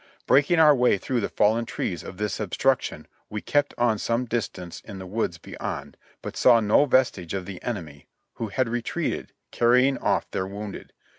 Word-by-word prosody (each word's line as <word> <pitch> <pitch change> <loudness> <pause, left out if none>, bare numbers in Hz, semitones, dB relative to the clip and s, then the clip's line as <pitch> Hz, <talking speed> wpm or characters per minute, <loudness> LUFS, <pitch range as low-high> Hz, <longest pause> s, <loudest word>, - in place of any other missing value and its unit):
Breaking 145 +5 +4
our 155 -2 +7
way 125 -5 +3
through 125 +5 -2
the - - -2
fallen 110 +3 +2
trees 90 -6 -3
of 90 - -9
this 105 0 -2
obstruction 125 +6 0 0.2
we 105 - -4
kept 145 +6 0
on 120 -3 +2
some 115 +3 0
distance 110 -7 -4
in 100 - -9
the 95 - -7
woods 95 -3 -2
beyond, - - -6 0.3
but - - -6
saw 115 - +6
no 110 +6 +4
vestige 130 - +1
of 95 -2 -4
the 95 -1 -8
enemy, 80 -11 -6 0.3
who 115 - -3
had 115 +5 0
re 120 +1 -1
treated, - - -3 0.2
carrying 125 +3 +3
off - - 0
their 95 - -2
wounded. 100 +1 -7
110 Hz, 180 wpm, -25 LUFS, 100-125 Hz, 0.3 s, our